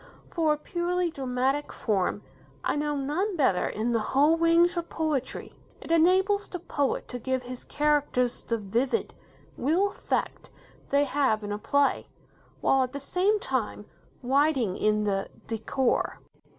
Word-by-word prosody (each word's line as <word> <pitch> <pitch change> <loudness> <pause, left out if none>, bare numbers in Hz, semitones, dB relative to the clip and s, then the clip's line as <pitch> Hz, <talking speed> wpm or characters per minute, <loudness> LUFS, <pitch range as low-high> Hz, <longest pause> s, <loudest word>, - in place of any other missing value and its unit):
For 320 -3 +2
a - - -3
purely 350 +2 -1
dramatic 265 +1 -1
form, 200 -5 -1 0.4
I - - 0
know 295 0 -1
none 310 +9 -1
better 260 - +2
in 225 +3 -2
the 230 - +2
whole 285 +8 +3
range 335 +1 +4
of 340 -1 -3
poetry. 305 -5 -2 0.3
It - - -8
enables 375 +5 +3
the 360 - -5
poet 285 -5 -2
to 250 - -5
give 260 +1 -2
his 250 0 -8
characters 290 -4 +1
the 230 - -2
vivid, 230 +6 -1 0.4
real 340 +10 +2
effect - - -3 0.4
they 280 +1 +3
have 265 -6 +1
in 205 - -4
a 205 - -3
play, 285 +5 +1 0.5
while 270 - +3
at 255 0 -1
the 280 - -4
same 375 +9 +1
time 240 - -2 0.4
writing 265 -6 +2
in 215 0 +1
the 195 -2 -1 0.2
'decor'. 230 +3 -1
280 Hz, 150 wpm, -27 LUFS, 245-330 Hz, 0.5 s, range